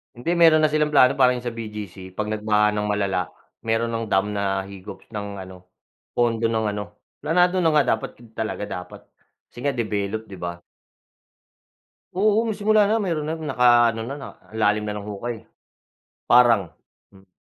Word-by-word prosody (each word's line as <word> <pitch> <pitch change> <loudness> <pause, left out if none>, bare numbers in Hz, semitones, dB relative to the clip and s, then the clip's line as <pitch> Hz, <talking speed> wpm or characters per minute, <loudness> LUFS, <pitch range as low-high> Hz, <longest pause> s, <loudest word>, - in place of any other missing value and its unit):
Hindi 120 +8 -5
meron 165 -2 +6
na 155 - +4
silang 150 0 +1
plano 130 -3 +5
parang 125 -2 +3
yung 125 - -7
sa 120 - -4
BGC, 105 -4 -7
'pag 105 +3 -4
nagbaha 105 0 +1
ng 105 - -1
malala 100 -4 -1 0.3
meron 115 +1 0
ng 115 0 -2
dam 95 +1 +2
na 100 -1 0
higop 100 0 -10
ng 100 -2 -6
ano, 95 -1 -11 0.5
pondo 115 -1 +2
ng 110 -1 0
ano, 105 0 -7 0.3
planado 180 +4 +3
na 165 - +4
nga 150 -5 +3
dapat - - -9
eb 115 -2 -17
talaga 110 -2 -3
dapat 90 -2 -8 0.4
kasi 120 - -12
nga 145 - +2
develop, 110 -3 -2
di - - -11
ba? 85 -1 -5 1.6
Oo, 210 +4 +3
may 225 - -1
simula 215 +1 +4
na 225 - +2
meron 170 -7 -1
ng 160 0 -4
naka 120 -3 +5
ano 115 - -4
na, 135 +5 -5
na - - -7 0.2
lalim 105 -1 +1
na 105 0 -4
ng 100 - -9
hukay. 110 +2 -6 0.8
Parang, 120 -7 +4 0.4
hmm. 95 -1 -20
110 Hz, 175 wpm, -23 LUFS, 105-135 Hz, 1.6 s, meron